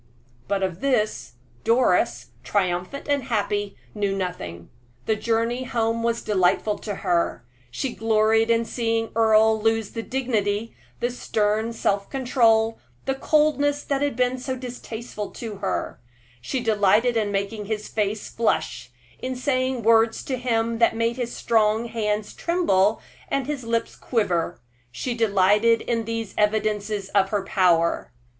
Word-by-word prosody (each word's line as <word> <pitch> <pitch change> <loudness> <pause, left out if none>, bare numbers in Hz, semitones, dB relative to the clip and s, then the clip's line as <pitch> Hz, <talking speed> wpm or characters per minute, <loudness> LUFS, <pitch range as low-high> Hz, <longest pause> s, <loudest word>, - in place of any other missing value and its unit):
But 195 -1 0
of 185 -2 -2
this, 235 - 0 0.3
Doris, 180 - +2
triumphant 185 - -1
and 285 -3 0
happy, 205 -4 -1 0.2
knew 200 -2 -1
nothing. 85 - -5 0.3
That 220 -1 0
journey 235 +2 0
home 230 -1 0
was 230 0 -1
delightful 205 +1 +1
to 205 -2 -4
her. 170 -8 0 0.2
She 245 - -3
gloried 225 0 +2
in 230 0 +3
seeing 225 -1 -1
Earle 220 -1 +4
lose 225 -1 +1
the 230 - -4
dignity, 225 -4 -1 0.3
the 240 - 0
stern 220 -1 0
self 200 -3 -1
control, 230 -4 +2 0.3
the 270 - +1
coldness 290 0 +2
that 280 -1 -1
had 285 -4 0
been 250 +1 +1
so 260 +1 -3
distasteful 240 -4 -6
to 220 -4 -6
her; - - -3 0.4
she 250 - -2
delighted 220 +2 +3
in 215 -2 0
making 200 +2 -2
his 210 0 -3
face 210 0 -2
flush, 225 - -1 0.3
in 255 0 -3
saying 255 -2 0
words 225 0 +4
to 260 - -2
him 230 -2 0
that 230 -1 +4
made 230 +1 0
his 240 -2 -3
strong 220 0 +2
hands 215 -2 -2
tremble 225 - +2 0.3
and 275 -2 0
his 290 -3 -4
lips 230 0 -1
quiver; 175 -8 -1 0.3
she 245 - -3
delighted 215 +1 +3
in 230 -2 -1
these 225 -2 -4
evidences 210 -1 0
of 195 -1 +2
her 205 -2 -1
power. 175 -4 +2
225 Hz, 140 wpm, -24 LUFS, 205-240 Hz, 0.4 s, Earle